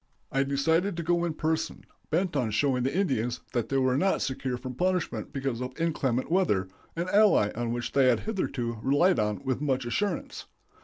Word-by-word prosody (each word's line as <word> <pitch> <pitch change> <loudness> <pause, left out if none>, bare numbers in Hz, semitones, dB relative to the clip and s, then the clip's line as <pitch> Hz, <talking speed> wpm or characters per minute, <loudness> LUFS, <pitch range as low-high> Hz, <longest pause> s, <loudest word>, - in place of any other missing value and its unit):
I 135 - +2
decided 160 +7 +1
to 170 - -2
go 175 +1 +1
in 165 -3 -2
person, 160 0 -2 0.3
bent 170 +1 0
on 125 -5 +1
showing 125 +4 +1
the 135 +7 -1
Indians 125 - 0
that 120 -3 -1
they 135 - +1
were 130 0 +2
not 190 +3 +2
secure 130 -1 -2
from 130 +1 -6
punishment 180 +4 -1
because 135 -3 -3
of 130 +4 -6
inclement 140 -6 0
weather 105 - +2 0.3
an 170 +2 -2
ally 200 - +4
on 120 0 -2
which 120 0 -3
they 135 -2 +4
had 125 - +3
hitherto 125 - -3
relied 135 - +2
with 130 0 -1
much 135 -4 0
assurance. 210 - -2
135 Hz, 185 wpm, -28 LUFS, 125-170 Hz, 0.3 s, ally